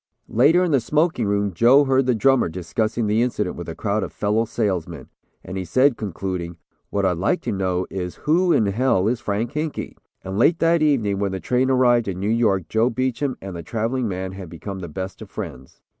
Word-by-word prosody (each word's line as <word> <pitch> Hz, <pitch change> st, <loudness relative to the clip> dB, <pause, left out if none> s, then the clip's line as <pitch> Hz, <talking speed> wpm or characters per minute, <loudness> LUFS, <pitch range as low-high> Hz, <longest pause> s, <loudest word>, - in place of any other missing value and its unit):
Later, 150 Hz, +10 st, +4 dB
in 175 Hz, -, 0 dB
the 140 Hz, -, +4 dB
smoking 150 Hz, +2 st, +1 dB
room, 100 Hz, -1 st, 0 dB
Joe 125 Hz, +10 st, +5 dB
heard 135 Hz, -1 st, +2 dB
the 125 Hz, -, +3 dB
drummer 135 Hz, -3 st, +3 dB
discussing 110 Hz, +7 st, -2 dB
the 105 Hz, +2 st, +2 dB
incident 105 Hz, -6 st, -1 dB
with 85 Hz, -, -7 dB
a 80 Hz, -, -6 dB
crowd 105 Hz, 0 st, -1 dB
of -, -, -4 dB
fellow 105 Hz, +2 st, 0 dB
salesmen, 90 Hz, -, -3 dB, 0.3 s
and 95 Hz, +1 st, -6 dB
he -, -, -3 dB
said, 130 Hz, -, +3 dB
concluding, 90 Hz, -4 st, -4 dB, 0.3 s
"What 100 Hz, -1 st, 0 dB
I'd 90 Hz, -3 st, +1 dB
like 165 Hz, -, +1 dB
to -, -, -3 dB
know 95 Hz, -2 st, -1 dB
is 90 Hz, -2 st, -4 dB
who 175 Hz, +4 st, +3 dB
in 110 Hz, -, +3 dB
hell 100 Hz, -1 st, +1 dB
is 120 Hz, +1 st, 0 dB
Frank 110 Hz, +2 st, -2 dB
Hinkey?" 150 Hz, 0 st, -4 dB, 0.3 s
And 95 Hz, +2 st, -4 dB
late 165 Hz, +8 st, +4 dB
that 165 Hz, 0 st, +2 dB
evening 115 Hz, -10 st, +2 dB
when 100 Hz, -1 st, -1 dB
the 95 Hz, -, -3 dB
train 125 Hz, +6 st, +1 dB
arrived 120 Hz, -3 st, +3 dB
in 95 Hz, -2 st, -3 dB
New 100 Hz, +2 st, -1 dB
York 105 Hz, -7 st, +1 dB
Joe 110 Hz, +6 st, +2 dB
Beacham 130 Hz, +2 st, -2 dB
and 95 Hz, -2 st, -6 dB
the 85 Hz, -, -5 dB
traveling 115 Hz, +7 st, -2 dB
man 95 Hz, -1 st, -4 dB
had 95 Hz, -3 st, -9 dB
become 95 Hz, +4 st, -7 dB
the 90 Hz, -, -6 dB
best 95 Hz, +6 st, -6 dB
of 110 Hz, -, -9 dB
friends. 75 Hz, -12 st, -8 dB
105 Hz, 215 wpm, -22 LUFS, 95-130 Hz, 0.3 s, Joe